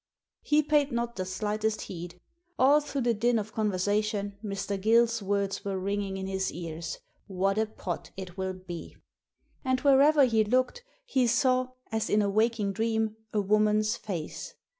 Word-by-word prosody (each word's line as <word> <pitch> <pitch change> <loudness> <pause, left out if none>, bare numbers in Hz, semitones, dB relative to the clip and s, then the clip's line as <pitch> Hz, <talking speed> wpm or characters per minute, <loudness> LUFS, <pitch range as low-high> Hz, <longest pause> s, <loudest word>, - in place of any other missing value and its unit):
He 300 +1 +3
paid 295 -1 +2
not 235 0 -2
the 185 - -3
slightest 210 +3 -1
heed. 175 0 -7 0.4
All 285 +4 +5
through 285 -2 -3
the 240 -1 +2
din 235 +2 +2
of 215 0 -4
conversation 205 0 0
Mr. 200 -1 -3
Gill's 230 +1 +3
words 200 0 -1
were 195 -1 -2
ringjing 200 0 -2
in 190 - -4
his 190 0 -1
ears— 165 -1 -5 0.3
"What 195 +1 0
a 220 - +1
pot 180 -5 -5
it 185 -2 -7
will 190 -1 -2
be!" 185 -2 -9 0.7
And 260 -1 +1
wherever 285 +1 +6
he 225 -3 +3
looked 255 - 0 0.2
he 260 - +2
saw, 255 +2 +2 0.2
as 220 0 -1
in 210 0 +3
a 200 - 0
waking 215 -1 +1
dream, 220 0 0 0.2
a 210 - +1
woman's 215 +2 +2
face. 175 -9 -6
215 Hz, 160 wpm, -28 LUFS, 195-235 Hz, 0.7 s, wherever